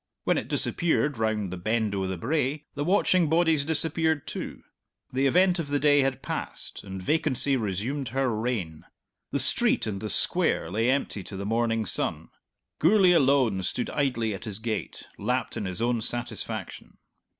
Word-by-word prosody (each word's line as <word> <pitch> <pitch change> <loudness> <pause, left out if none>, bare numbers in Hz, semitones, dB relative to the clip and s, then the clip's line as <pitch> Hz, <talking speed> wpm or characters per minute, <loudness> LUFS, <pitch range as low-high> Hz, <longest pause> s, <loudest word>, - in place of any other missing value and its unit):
When - - +1
it - - -8
disappeared 150 -6 +1
round 105 -4 -1
the - - -5
Bend 110 +2 -1
o' 95 -1 -2
the 95 -1 -4
Brae 145 - -1
the 145 - -3
watching 180 -2 +2
bodies 160 -2 +3
disappeared 160 0 +1
too; - - -7 0.5
the 135 +2 +2
event 180 +5 +3
of 165 - -3
the 145 0 0
day 145 0 +4
had 135 -1 0
passed, - - -6
and 95 -1 -8
vacancy 145 - +3
resumed 120 +5 -3
her 130 -1 -1
reign. 105 -9 -3 0.5
The - - -1
street - - +2
and 100 -2 -4
the 110 - -4
Square 85 - +2
lay 115 +5 +1
empty 130 -6 -1
to 95 - -7
the 100 - -5
morning 115 0 0
sun. - - +1 0.5
Gourlay 185 +2 +5
alone 135 - +3
stood 105 +6 -2
idly 115 -6 -1
at 100 - -7
his 105 -3 -4
gate, 110 0 -5
lapped 125 +5 -2
in - - -4
his 95 +4 -2
own 120 -1 0
satisfaction. 120 +2 -2
125 Hz, 170 wpm, -26 LUFS, 110-145 Hz, 0.5 s, Gourlay